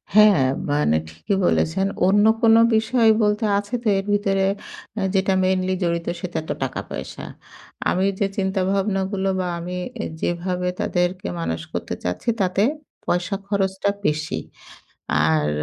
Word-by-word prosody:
হ্যাঁ, 210 -7 +7 0.3
মানে 145 - +2
ঠিকই 85 - -2
বলেছেন। 175 +3 +2 0.2
অন্য 205 +2 +4 0.2
কোন 225 -2 +6 0.2
বিষয় 225 +1 +3
বলতে, 210 +1 +2
আছে 205 +3 -5
তো 225 - -2
এর 195 - -2
ভিতরে 195 -1 +1 0.5
অ্যা 210 - -2
যেটা 190 0 +2
মেইনলি 185 0 +1
জড়িত, 170 -1 -1
সেটা 175 -3 -3
তো - - -1
টাকা 130 - -3
পয়সা। - - -6 0.7
আমি 185 +1 +1
যে 200 - +3
চিন্তা 190 0 0
ভাবনাগুলো 195 0 0
বা, 185 - -1
আমি 180 +2 -5 0.2
অ্যা 220 - -3 0.2
যেভাবে 180 +1 -1
তাদেরকে 180 +1 -1
মানুষ 80 -1 -2
করতে - - -3
চাচ্ছি, 90 - -2
তাতে 190 +1 +2 0.4
পয়সা 175 +2 0
খরচটা 195 -1 0 0.2
বেশি। 155 +1 0 0.8
আর 80 -1 +2
190 Hz, 140 wpm, -22 LUFS, 175-200 Hz, 0.8 s, হ্যাঁ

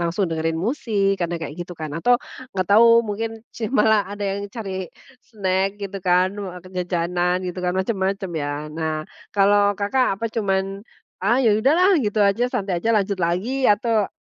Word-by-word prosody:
langsung 170 +4 0
dengerin 160 0 -1
musik, 200 - 0
kadang 175 0 -1
kayak 150 -3 -5
gitu, 175 +1 -6
kan. 155 -2 -6
Atau, 245 +9 +4 0.4
nggak 185 - +1
tahu, 220 +3 +7 0.2
mungkin 225 +1 -4
sih, 220 -2 -4
malah 215 -4 +3
ada 205 0 -5
yang 200 +1 -3
cari 190 -4 -5 0.3
snack, 195 -4 -1
gitu 200 0 -5
kan, 180 +1 +2
wa 185 -3 -6
ke - - -11
jajanan, 180 0 0
gitu 180 0 -4
kan? 180 0 0
Macem-macem, 190 -1 -1
ya. 150 -1 -4
Nah, 155 -1 -3 0.3
kalau 205 0 +4
Kakak 205 +1 +1
apa 230 - -5
cuman, 195 -3 -1 0.4
"Ah, 215 +6 +2
ya 220 - +5
udahlah!" 340 - +4
Gitu 210 -3 -2
aja, 200 +5 +2
santai 195 -3 -1
aja, 225 - -2
lanjut 200 -1 0
lagi, 195 +11 -1
atau 215 0 +2
195 Hz, 175 wpm, -22 LUFS, 180-215 Hz, 0.4 s, tahu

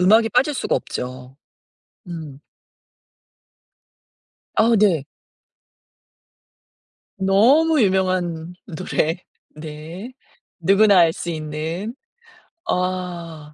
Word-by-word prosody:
음악이 220 +5 +5
빠질 270 +4 +2
수가 - - -1
없죠. 125 +1 -6 0.7
음. 155 -5 -7 2.2
아 230 +2 +4
네. 175 -9 +3 2.1
너무 255 +11 +4
유명한 185 -4 0
노래. 165 -1 -1 0.4
네. 160 +9 -8 0.5
누구나 195 +3 +5
알 165 -1 +5
수 175 - -5
있는. 160 - -4 0.7
아. 175 - -3
180 Hz, 125 characters per minute, -21 LUFS, 160-205 Hz, 2.2 s, 음악이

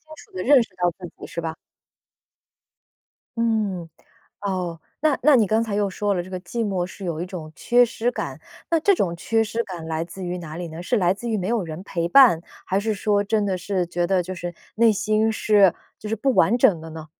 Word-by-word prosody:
楚 - - -16
地 185 0 -4
认 275 -2 +6
识 - - -15
到 175 0 +2
自 180 -2 -8
己 - - -9
是 170 - -5
吧？ 160 -1 -4 1.8
嗯， 210 -7 0 0.5
哦， 180 -4 -3 0.2
那 305 -3 +3
那 300 -3 +6
你 220 -4 +4
刚 220 +3 +2
才 210 -3 -2
又 205 -1 +1
说 205 +1 -1
了， 175 - -1
这 185 - -12
个 185 -1 -5
寂 230 +3 -3
寞 185 -3 -1
是 185 +1 -9
有 165 -2 -3
一 180 - -4
种 160 -4 -8
缺 245 +1 +4
失 235 +1 -1
感， - - -5 0.3
那 330 -1 +3
这 400 +4 +4
种 180 - 0
缺 225 +6 +1
失 225 +2 -2
感 175 -6 -8
来 160 0 -2
自 180 +2 -8
于 180 +1 -3
哪 160 -2 -8
里 175 - -4
呢？ 165 +1 -8
是 240 +6 0
来 180 -2 +3
自 235 +4 -6
于 220 - 0
没 185 -2 -2
有 230 -2 0
人 160 0 -6
陪 170 -3 -2
伴， 235 -9 +7 0.2
还 190 - 0
是 220 +1 -1
说 205 0 +1
真 210 0 0
的 190 -2 0
是 180 0 -2
觉 175 0 -1
得 185 0 +2
就 185 +2 -5
是 175 0 -5 0.2
内 230 0 +5
心 215 +2 +1
是 205 -4 +4 0.2
就 215 - -8
是 225 - -1
不 265 +4 +1
完 220 +9 +4
整 175 -8 +4
的 160 0 -9
呢？ 160 -1 -8
195 Hz, 250 characters per minute, -23 LUFS, 175-220 Hz, 1.8 s, 伴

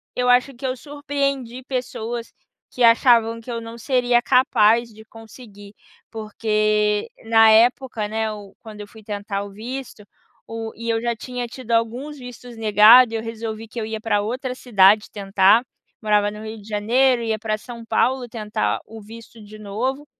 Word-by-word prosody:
eu 250 0 0
acho 250 +2 +3
que 260 +2 -5
eu 255 - -2
surpreendi 275 -3 -4
pessoas 240 -2 -5 0.4
que 250 - -2
achavam 230 -1 +4
que 230 +2 -13
eu 230 -1 -4
não 230 +1 -9
seria 245 -1 +1
capaz 235 -3 +3
de 220 +1 -14
conseguir, 220 -2 -14 0.4
porque 215 -1 0
na 225 0 +5
época, 230 0 +2
né, 220 0 -2
hum, 205 -2 -11
quando 215 -2 -10
eu 205 - -9
fui 220 +1 -15
tentar 205 -1 -5
o 200 - -11
visto, 235 +2 -8 0.4
o 225 0 -6
e 230 +1 -6
eu 225 0 0
já 235 0 -1
tinha 245 +1 -6
tido 240 -1 -9
alguns 240 +6 -1
vistos 245 -1 -11
negado, 225 +3 +6
e - - -2
eu 225 - -2
resolvi 225 -1 -6
que 235 - -6
eu 220 - -3
ia 220 0 -5
pra 215 -2 0
outra 250 +4 -4
cidade 210 -4 +3
tentar, 200 +2 +3 0.4
morava 210 -1 +2
no 210 +1 -9
Rio 220 -1 -8
de 200 - -16
Janeiro, 235 +4 +2
ia 220 -1 -2
pra 215 -1 -2
São 235 0 -11
Paulo 245 +3 0
tentar 215 -3 -2
o 225 0 -11
visto 225 +2 -13
de 215 +1 -13
novo, 245 +8 -4
225 Hz, 175 wpm, -21 LUFS, 215-245 Hz, 0.4 s, negado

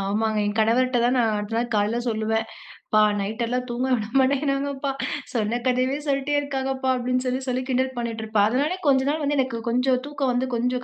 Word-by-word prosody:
ஆமாங்க. 215 +2 0
என் 205 - -1
கணவர்ட்ட 245 +3 +3
தான் 250 +2 +2
நான் 225 -2 +2
அடுத்த 210 +2 -4
நாள் 240 0 -1
காலைல 210 +3 +1
சொல்லுவேன். 220 0 0 0.5
ப்பா 215 0 +4 0.2
நைட் 220 +4 -4
எல்லாம் 250 +1 -2
தூங்க 245 +2 -1
விட 215 -2 -3
மாட்டேங்கிறாங்கப்பா. 275 0 0 0.4
சொன்ன 230 +1 0
கதையவே 255 +2 +1
சொல்ட்டே 275 +1 0
இருக்காங்கப்பா. 270 -2 -2
அப்படின்னு 255 +1 0
சொல்லி, 255 0 0
சொல்லி 255 0 0
கிண்டல் 260 0 0
பண்ணிட்டுருப்பேன். 220 -3 0
அதனாலேயே 295 +9 0
கொஞ்ச 265 -1 +4
நாள் 310 +1 -1
வந்து 290 0 0
எனக்கு 255 -3 -1
கொஞ்சம் 255 +1 +2
தூக்கம் 280 -3 -1
வந்து 255 +1 0
கொஞ்சம் 250 +1 -1
250 Hz, 185 wpm, -24 LUFS, 225-265 Hz, 0.5 s, ப்பா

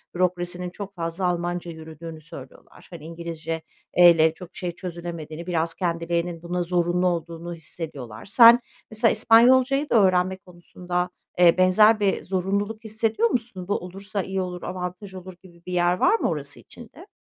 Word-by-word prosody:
bürokrasinin 180 0 -1
çok 200 +2 -9
fazla 165 +2 -3
Almanca 175 0 -2
yürüdüğünü 160 0 -10
söylüyorlar. - - -13
Hani, - - -10
İngilizceyle 165 0 +1
çok 180 +1 -13
şey 175 -2 -4
çözülemediğini, 170 -2 -7
biraz 165 -1 0
kendilerinin 170 -1 -2
buna 175 +1 -2
zorunlu 175 +1 +1
olduğunu 170 0 -3
hissediyorlar. 145 -8 -8
Sen 235 +3 +8 0.3
mesela 220 +1 +3
İspanyolcayı 260 +6 +4
da - - +1
öğrenme 185 -2 +3
konusunda, 180 -1 -5 0.3
eee, 175 -1 +6
benzer 210 +4 +5
bir 200 -2 0
zorunluluk 200 +4 -2
hissediyor 220 +1 0
musun? 220 -7 -4
Bu 205 - 0
olursa 195 +2 -5
iyi 190 0 -3
olur, 180 -1 -6
avantaj 185 +2 -6
olur 185 0 -9
gibi 170 -2 -17
bir 180 - -6
yer 175 0 +3
var 455 - +3
mı - - 0
orası - - -4
için - - -14
de? - - -13
180 Hz, 150 wpm, -24 LUFS, 170-195 Hz, 0.3 s, Sen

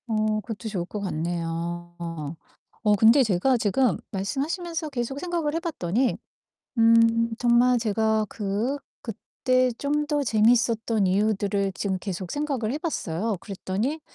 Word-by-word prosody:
어 215 -1 +1
그것도 225 0 -6
좋을 185 -5 -3
것 210 - -6
같네요. 170 -1 -3 0.9
어 210 -1 +4
근데 225 +6 +6
제가 225 +4 +2
지금 225 -1 +2
말씀하시면서 310 - -3
계속 270 0 -3
생각을 335 -3 -2
해 - - +1
봤더니 255 - -1 0.6
음 230 0 +5
정말 245 +1 +4
제가 220 0 +1
그 215 +6 -2 0.2
그때 255 +3 0
좀 295 +1 0
더 295 -1 +1
재밌었던 225 -2 +2
이유들을 200 0 +1
지금 195 -1 -2
계속 185 -2 -5
생각을 275 -7 -1
해 - - -1
봤어요. 215 - -2
그랬더니 205 - -3
225 Hz, 275 characters per minute, -25 LUFS, 200-260 Hz, 0.9 s, 근데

